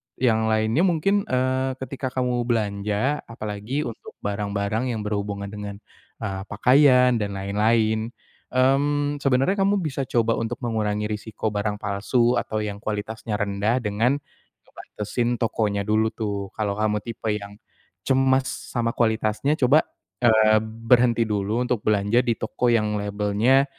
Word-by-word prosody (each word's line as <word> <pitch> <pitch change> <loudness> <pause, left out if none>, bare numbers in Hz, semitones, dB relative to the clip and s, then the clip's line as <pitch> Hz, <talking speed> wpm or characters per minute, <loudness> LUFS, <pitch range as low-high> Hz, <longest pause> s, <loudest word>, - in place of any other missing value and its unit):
yang 110 -3 +2
lainnya 110 +7 +2
mungkin, 195 +5 +1
eee, 130 +1 0
ketika 130 +1 -4
kamu 125 -2 0
belanja, 105 +4 0
apalagi 110 +5 -4
untuk 115 -5 -8
barang-barang 100 +2 -1
yang 110 - -3
berhubungan 100 -1 -3
dengan, 105 -1 -6 0.5
eee, 95 -2 -3
pakaian 125 +1 +4
dan 100 -2 -3
lain-lain, 110 +3 +1 0.5
mmm, 145 +3 +2
sebenernya 135 +6 +2
kamu 195 0 +2
bisa 135 -4 -3
coba 115 -3 +1
untuk 115 +3 -4
mengurangi 105 -2 -1
resiko 110 0 -3
barang 105 0 -1
palsu 105 +5 +1
atau 110 0 -3
yang 100 -1 -5
kualitasnya 110 +1 -4
rendah, 105 +4 0
dengan 115 +5 +1 0.5
ngebantesin 120 +3 -3
tokonya 105 -3 -1
dulu, 110 +2 +2
tuh. 100 -3 -3
Kalau 105 -1 -2
kamu 105 -1 0
tipe 115 -1 -5
yang 100 0 -8 0.5
cemas 130 0 +3 0.3
sama 115 -2 0
kualitasnya 110 +5 +1
coba, 140 +3 +5 0.4
eee, 110 -2 +5
berhenti 115 +1 +2
dulu 105 +3 -1
untuk 125 -3 -1
belanja 105 +3 +2
di 120 -3 -1
toko 120 +2 -1
yang 110 -3 +2
labelnya 105 +6 +2
110 Hz, 135 wpm, -24 LUFS, 105-125 Hz, 0.5 s, coba